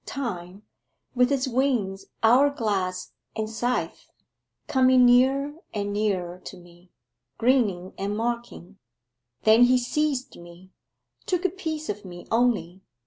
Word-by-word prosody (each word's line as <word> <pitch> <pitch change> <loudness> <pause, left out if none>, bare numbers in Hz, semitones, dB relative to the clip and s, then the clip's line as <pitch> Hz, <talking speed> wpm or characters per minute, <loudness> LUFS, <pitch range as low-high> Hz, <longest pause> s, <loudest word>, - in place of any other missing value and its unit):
Time, 195 -7 -5 0.5
with 250 0 +3
his 275 -1 0
wings, 240 -7 -1 0.2
hour 250 +6 +6
glass, 195 -8 -2 0.2
and 220 -1 -2
scythe, 240 +3 -3 0.6
coming 255 -1 +4
nearer 265 +4 +4 0.2
and 205 -1 -2
nearer 185 -4 -1
to 185 - -10
me 175 0 -18 0.5
grinning 215 -8 +1
and 200 +2 -2
mocking: 230 -5 -4 0.6
then 220 +3 +6
he 255 +1 +4
seized 270 +1 -2
me, 175 +2 -15 0.6
took 360 0 -1
a - - +4
piece 320 -4 -5
of 210 0 -4
me 175 -2 -10
only... 225 -6 +1
225 Hz, 125 wpm, -25 LUFS, 190-255 Hz, 0.6 s, hour